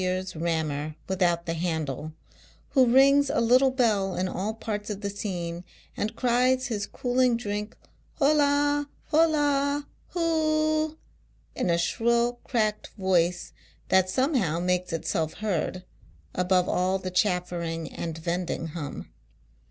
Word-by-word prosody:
iur's 185 0 -2
rammer 155 -2 -2
without 175 -3 +1
the 165 - -2
handle, 160 -3 -3 0.6
who 260 -3 +4
rings 275 +2 +5
a - - +1
little 250 +3 +5
bell 215 -7 +1
in 185 - 0
all 195 +4 -2
parts 210 -2 -4
oi'tlie 200 -1 -3
scene, 175 -4 -4 0.3
and 215 +2 -3
fries 255 +1 +2
hi.s 210 -3 -2
cooling 250 -1 +1
drink 210 -1 -4 0.4
IJola, 290 0 +3 0.2
liola, 290 -3 +2 0.3
U.o - - -1
o - - +1
o! 310 -1 +1 0.6
in - - -1
a 170 - +3
shrill 235 +6 +1
cracked 215 -4 -1
voice 180 -2 +1 0.4
that 190 0 +4
somehow 235 - +1
makes 180 0 0
nl. 170 +3 -2 0.5
above 180 0 +2
all 185 +1 +1
the 185 -1 -5
chaffering 175 -3 -1
and 165 -1 -5
vending 170 0 -3
hum. 150 -3 -6
200 Hz, 125 wpm, -26 LUFS, 175-255 Hz, 0.6 s, rings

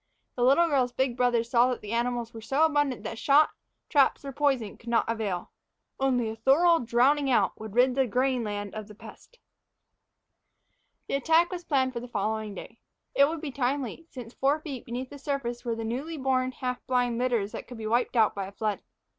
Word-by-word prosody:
The 245 - -4
little 275 +7 +5
girl's 265 -5 +1
big 260 -1 -1
brothers 240 -1 +1
saw 245 0 +5
that 250 - -3
the 210 - -7
animals 235 0 -1
were 225 - -8
so 270 +8 +2
abundant 290 -5 0
that 225 - -5
shot, 290 +2 +4 0.4
traps, 280 -1 +2
or 275 - -4
poison 265 -6 0
would 235 - -18
not 235 -1 +2
avail 215 -6 -3 0.5
only 255 -3 +1
a - - -7
thorough 320 +9 +4
drowning 260 +5 +2
out 250 - +3
would 215 -1 -8
rid 250 +1 +4
the 265 0 +1
grain 255 +2 +1
land 205 -1 -4
of 215 -1 -6
the 210 - -13
pest. - - -14 1.7
The - - -4
attack 325 +6 +3
was 355 -1 -5
planned 260 -3 +1
for 235 - -3
the 245 - -8
following 215 -1 -2
day. - - -10 0.3
It 280 - +6
would 325 -1 -4
be 300 - -4
timely, 275 +3 -2
since 245 -3 -9
four 280 +3 +1
feet 275 -6 -7
beneath 250 +3 -5
the 285 - -9
surface 260 -4 -3
were 235 -2 -2
the 225 - -5
newly 275 +8 -4
born, 260 -1 0
half 250 -1 -4
blind 245 -2 +1
litters 235 -5 0
that - - -7
could 245 - -9
be 220 - -6
wiped 240 +3 0
out 220 -3 +4
by 195 -1 -4
a - - -10
flood. 210 0 -2
250 Hz, 205 wpm, -27 LUFS, 230-275 Hz, 1.7 s, It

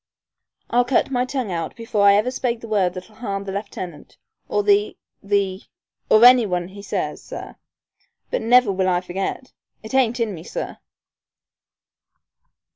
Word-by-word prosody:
"I'll 245 +1 +4
cut 250 +2 +1
my 250 -1 +1
tongue 255 -6 -3
out 165 -2 -3
before 225 -3 +1
I 200 - +7
ever 215 +5 +1
spake 245 -2 -2
the 230 - -8
word 195 -4 +1
that'll 185 +4 -10
harm 200 -4 -4
the 195 - -5
lieutenant, 185 -6 -7 0.3
or 205 - +1
the 205 +1 +2 0.2
the 200 -1 0 0.5
or 220 +2 +7
any 245 -3 +7
one 180 -1 -2
he 200 +1 -11
says, 200 - -3
sir. - - -8 0.8
But - - 0
never 240 -1 +5
will 190 -1 +1
I 175 -1 +1
forget! 190 +8 -5 0.3
It 220 - -9
ain't 250 -2 +2
in 225 -3 0
me, 165 - -8
sir." - - -6
205 Hz, 160 wpm, -22 LUFS, 190-240 Hz, 0.8 s, I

